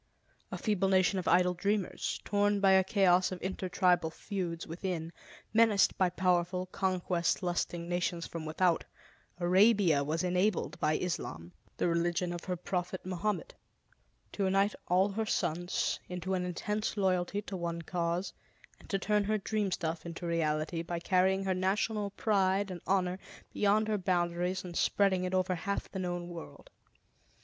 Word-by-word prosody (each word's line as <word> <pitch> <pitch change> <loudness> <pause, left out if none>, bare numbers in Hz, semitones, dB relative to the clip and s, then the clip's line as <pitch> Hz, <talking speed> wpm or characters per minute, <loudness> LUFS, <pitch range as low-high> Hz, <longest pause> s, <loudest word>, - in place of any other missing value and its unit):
A - - -3
feeble 205 -5 +1
nation 190 0 +3
of 180 - -5
idle 180 0 +4
dreamers, 200 +1 -1
torn 205 0 +2
by 195 -1 +5
a 190 0 +6
chaos 185 -2 +3
of 185 - -5
intertribal 180 -2 +1
feuds 175 -1 -4
within, 170 -1 -4 0.4
menaced 220 -3 +4
by 185 -1 +2
powerful, 180 0 +1
conquest 185 -2 -1
lusting 175 -1 -2
nations 175 -1 -1
from 165 -1 -6
without, 165 +2 +1 0.6
Arabia 185 -4 +4
was 155 +4 -1
enabled 180 -3 0
by 155 -1 +2
Islam, 85 - -4 0.3
the - - +1
religion 175 +1 0
of 175 - -7
her 180 - -1
prophet 180 +1 -3
Mohammed, 210 - -2 0.8
to 200 - -2
unite 195 +2 +2
all 185 +3 +3
her 220 +2 -2
sons 175 -2 -1
into 180 +1 -3
an 180 -1 0
intense 210 +5 -2
loyalty 190 +1 0
to 195 - -6
one 170 -1 -3
cause, 170 +2 -2 0.5
and - - -17
to 195 - +1
turn 210 +1 +1
her 215 +1 +1
dream 210 0 -1
stuff 165 -2 -2
into 170 +1 -7
reality 165 0 0
by 170 +1 -4
carrying 190 +2 +2
her 190 -1 +1
national 200 +3 0
pride 195 -1 +1
and 175 -2 -7
honor 185 -1 +1 0.3
beyond 210 +1 +2
her 215 -1 0
boundaries 180 0 0
and 175 -2 -8
spreading 190 -1 +2
it 185 +1 -1
over 185 0 +1
half 200 +3 -3
the 190 - -4
known 175 -1 -3
world. 170 - -10
185 Hz, 155 wpm, -31 LUFS, 175-195 Hz, 0.8 s, a